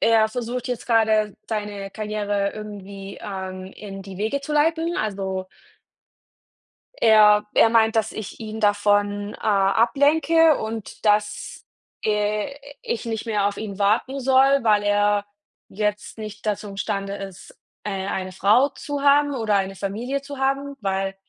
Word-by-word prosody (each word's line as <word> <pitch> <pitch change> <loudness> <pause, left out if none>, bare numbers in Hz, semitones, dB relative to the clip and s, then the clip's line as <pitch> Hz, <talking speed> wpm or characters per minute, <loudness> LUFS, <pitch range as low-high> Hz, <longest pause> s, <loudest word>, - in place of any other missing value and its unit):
er 225 -1 +4
versucht 245 +2 -4
jetzt 245 -2 -4
gerade, 220 -3 +2
seine 205 -2 -4
Karriere 205 -1 -2
irgendwie, 200 -2 -8
ähm, 190 -1 -6
in 195 -2 -8
die 190 -1 -10
Wege 220 +7 -1
zu 300 - -5
leiten. 325 +3 +1
Also 190 -3 -3 1.6
er 210 -2 +6
er 225 - +6
meint, 225 0 +4
dass 220 -1 +1
ich 220 -3 -7
ihn 220 -1 -6
davon, 205 0 +1
äh, - - -11
ablenke 285 +10 +3
und 220 -1 -6
dass, 210 0 0 0.4
äh, 210 +3 0 0.3
ich 230 - -3
nicht 225 -1 -3
mehr 210 -3 +1
auf 205 - -4
ihn 205 -2 -6
warten 225 +7 +1
soll, 270 +1 +4
weil 210 -2 +3
er 205 0 +2 0.4
jetzt 210 +1 -3
nicht 215 -1 -8
dazu 210 0 -2
im 195 - -10
Stande 200 -1 -2
ist, 195 -3 -10 0.3
äh, 195 -2 -3
eine 185 -1 -3
Frau 210 +9 +4
zu 285 0 -5
haben 285 0 +4
oder 220 -5 0
eine 195 0 0
Familie 230 +9 -3
zu 280 0 -8
haben, 275 +1 -1
weil 195 -1 -1
210 Hz, 145 wpm, -23 LUFS, 200-235 Hz, 1.6 s, er